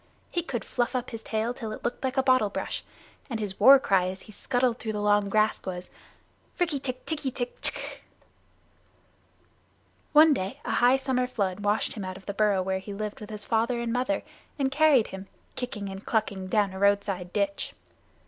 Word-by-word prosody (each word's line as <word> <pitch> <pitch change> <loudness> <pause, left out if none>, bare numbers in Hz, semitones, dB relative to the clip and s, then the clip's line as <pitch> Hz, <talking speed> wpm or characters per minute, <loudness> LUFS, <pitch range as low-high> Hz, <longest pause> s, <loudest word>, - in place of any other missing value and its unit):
He 345 - 0
could 270 -8 -4
fluff 245 +1 -1
up 250 -1 -2
his 225 -2 -6
tail 220 +2 -1
till 225 -4 -6
it 215 - -7
looked 240 - -3
like 260 +1 -2
a 265 - +4
bottle 255 -5 +4
brush, - - -4 0.5
and 230 -3 -3
his 205 -3 -5
war 265 +6 +9
cry 195 -9 +2
as 190 +1 -6
he - - -13
scuttled 245 +3 0
through 220 -1 -3
the 210 - -2
long 205 -1 +3
grass 215 +1 +2
was: 180 -1 -6 0.7
"Rikk 350 -2 +2
tikk 255 -2 -4
tikki 305 -4 -2
tikki 245 -1 -3
tchk!" - - +1 2.1
One 310 0 +7
day, 215 +4 -3
a - - -2
high 245 +2 +4
summer 260 -2 0
flood 200 -6 -2
washed 205 +1 +1
him 210 - -6
out 185 0 -5
of 190 - -15
the 200 - -4
burrow 200 -2 +2
where 190 0 -1
he 200 +1 -8
lived 210 0 -4
with 210 - -9
his 210 -1 -7
father 235 +2 +1
and 235 -1 -2
mother, 255 +4 0 0.3
and 270 -2 0
carried 290 -5 +4
him, 190 0 -8 0.3
kicking 225 -5 -4
and 195 +1 -7
clucking, 200 -4 -1
down 200 -1 +1
a 190 - -6
roadside 200 -3 +1
ditch. 200 0 -2
220 Hz, 195 wpm, -27 LUFS, 200-255 Hz, 2.1 s, war